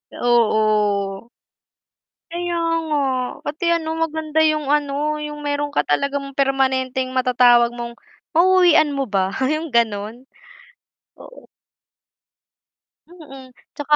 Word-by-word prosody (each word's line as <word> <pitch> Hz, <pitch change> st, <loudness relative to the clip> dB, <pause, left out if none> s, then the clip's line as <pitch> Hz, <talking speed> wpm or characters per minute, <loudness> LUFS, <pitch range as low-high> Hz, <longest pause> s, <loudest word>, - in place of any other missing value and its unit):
Oo. 215 Hz, -3 st, +1 dB, 1.0 s
Kaya 345 Hz, 0 st, -3 dB, 0.3 s
nga, 300 Hz, -1 st, 0 dB, 0.4 s
pati, 300 Hz, +4 st, -4 dB
ano, 330 Hz, -2 st, -1 dB
maganda 315 Hz, -1 st, -2 dB
yung, 305 Hz, -2 st, +1 dB
ano, 295 Hz, +1 st, 0 dB
yung 295 Hz, 0 st, -6 dB
meron 290 Hz, 0 st, -2 dB
ka -, -, -1 dB
talagang 275 Hz, -, -2 dB
permanenteng 260 Hz, -1 st, 0 dB
mata-tawag 245 Hz, -2 st, +4 dB
mong 235 Hz, 0 st, -7 dB, 0.4 s
mau-uwian 350 Hz, -3 st, +4 dB
mo 275 Hz, -1 st, -2 dB
ba 195 Hz, -2 st, 0 dB, 0.2 s
yung 310 Hz, +2 st, -2 dB
ganun. 230 Hz, +1 st, -1 dB, 0.9 s
Oo. -, -, -14 dB, 1.6 s
Mm, 275 Hz, -7 st, -14 dB, 0.2 s
tsaka 295 Hz, +1 st, +1 dB
275 Hz, 100 wpm, -20 LUFS, 240-305 Hz, 1.6 s, mata-tawag